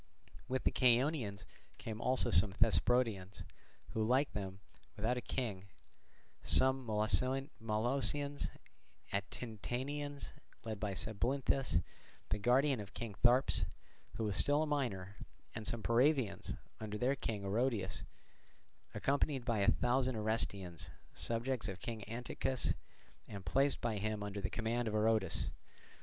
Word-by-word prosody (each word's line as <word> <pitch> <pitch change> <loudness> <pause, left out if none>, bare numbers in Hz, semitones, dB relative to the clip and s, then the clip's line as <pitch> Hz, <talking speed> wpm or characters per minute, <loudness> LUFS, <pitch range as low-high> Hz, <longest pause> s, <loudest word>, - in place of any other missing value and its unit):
With 130 0 -1
the - - +3
Chaonians 125 - +2 0.3
came 110 0 -6
also 130 +1 +2
some 95 +3 +5
Thesprotians, 105 -1 +2 0.5
like 125 +6 +2
them 95 -2 -4 0.4
without 110 +4 0
a 125 - -3
king, 105 -7 -3 0.7
some 130 -1 +5
Molossians 130 +4 +1 0.6
and 100 0 -1
Atintanians 135 +6 -4 0.3
led 110 -2 -4
by 100 -2 -2
Sabylinthus, 120 -2 +1 0.5
the 105 - 0
guardian 130 +4 +3
of 100 -1 -8
King 115 -3 -4
Tharyps 125 +2 +5 0.5
who 110 - -2
was 105 -3 -1
still 145 - +3
a - - 0
minor, 105 -10 -2 0.4
and 110 -1 -5
some 115 -2 -2
Paravaeans, 125 -2 +2 0.2
under 105 -1 -4
their 125 +5 +2
king 105 -7 -3
Oroedus, 100 -3 0 0.9
accompanied 140 -1 +1
by 115 -3 +1
a 100 - +4
thousand 125 +1 +2
Orestians, 100 -5 0 0.2
subjects 120 +2 0
of 95 -2 -5
King 110 +1 -5
Antichus 120 +2 0 0.5
and 100 -3 -8
placed 135 +9 +2
by 110 -3 -1
him 105 0 -2
under 100 0 -4
the 95 - -1
command 120 +1 -1
of 110 - -1
Oroedus. 110 -4 +1
115 Hz, 125 wpm, -36 LUFS, 105-130 Hz, 0.9 s, some